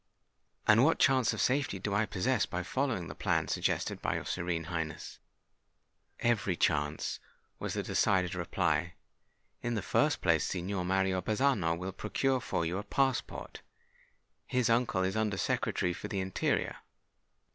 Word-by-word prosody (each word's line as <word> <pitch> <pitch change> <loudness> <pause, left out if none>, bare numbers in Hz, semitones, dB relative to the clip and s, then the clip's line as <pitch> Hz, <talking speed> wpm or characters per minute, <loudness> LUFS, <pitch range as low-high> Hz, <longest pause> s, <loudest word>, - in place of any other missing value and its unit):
"And 110 +3 +6
what 160 +3 +4
chance 130 -4 +4
of - - -4
safety 130 -6 +1
do 100 +2 -3
I 105 +1 +2
possess 110 +3 +1
by 90 +1 -3
following 130 -3 -1
the - - -6
plan - - 0
suggested - - -1
by - - 0
your - - -3
Serene 85 -2 -2
Highness?" 80 -2 -5 1.0
"Every 110 -6 +1
chance," 75 -2 0 0.4
was - - -3
the - - -1
decided 90 -3 +2
reply. 85 -2 0 0.7
"In 120 -1 -1
the 105 - -2
first - - +2
place, - - +3
Signor 90 0 -2
Mario 95 0 +1
Bazzano 105 -6 +1
will 90 +2 -4
procure 130 +7 0
for 85 - -1
you 90 +4 -1
a - - -5
passport: 135 +4 -1 0.9
his 125 -2 +1
uncle 115 -5 +2
is 95 +2 -1
Under 110 -3 0
Secretary 90 0 0
for 105 - -6
the 100 -2 -3
Interior. 95 -1 -1
95 Hz, 150 wpm, -31 LUFS, 90-115 Hz, 1.0 s, And